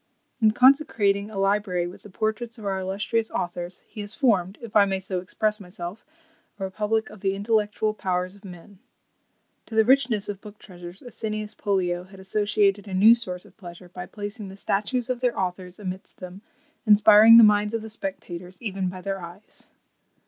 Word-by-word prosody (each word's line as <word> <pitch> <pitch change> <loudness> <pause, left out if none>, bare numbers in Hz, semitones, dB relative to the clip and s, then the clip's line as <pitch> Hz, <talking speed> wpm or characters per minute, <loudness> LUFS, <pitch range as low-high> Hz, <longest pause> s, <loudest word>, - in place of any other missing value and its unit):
"In 220 - +6
consecrating 215 -5 +3
a 215 - -8
library 195 -2 +1
with 185 +3 -9
the 210 - -13
portraits 220 +4 -3
of 215 - -10
our 195 -1 -1
illustrious 205 +4 -1
authors, 175 0 -4
he 215 - -8
has 205 +1 -5
formed, 200 -8 +1
if 230 -3 -10
I 210 - +8
may 195 -1 -1
so 190 -1 -3
express 210 +4 -1
myself, 180 +2 -8 0.5
a - - -4
republic 210 +3 -1
of 210 - -12
the 195 -1 0
intellectual 215 +1 0
powers 185 -2 -2
of 200 +1 -19
men." 185 +1 -12 0.9
To 225 - -8
the 220 0 +5
richness 245 -5 +3
of 200 -1 -6
book 210 -1 -12
treasures, 175 -2 -12
Asinius 215 -3 -5
Pollio 180 -3 -1
had 190 +1 -15
associated 205 +1 +1
a 190 - -4
new 215 +5 +8
source 185 -7 -3
of - - -19
pleasure, 175 -2 -11
by 180 0 -8
placing 205 +2 -7
the 190 - -11
statues 220 +5 -1
of 255 -2 -2
their 250 -1 0
authors 180 -1 -4
amidst 190 -2 -7
them, 185 +2 -10 0.5
inspiring 215 +2 +8
the 230 - +10
minds 210 +1 +4
of 225 - -3
the - - -7
spectators, 185 -3 -7
even 195 -5 -3
by 185 0 -8
their 195 0 -4
eyes. 175 +5 -11
200 Hz, 185 wpm, -25 LUFS, 185-215 Hz, 0.9 s, the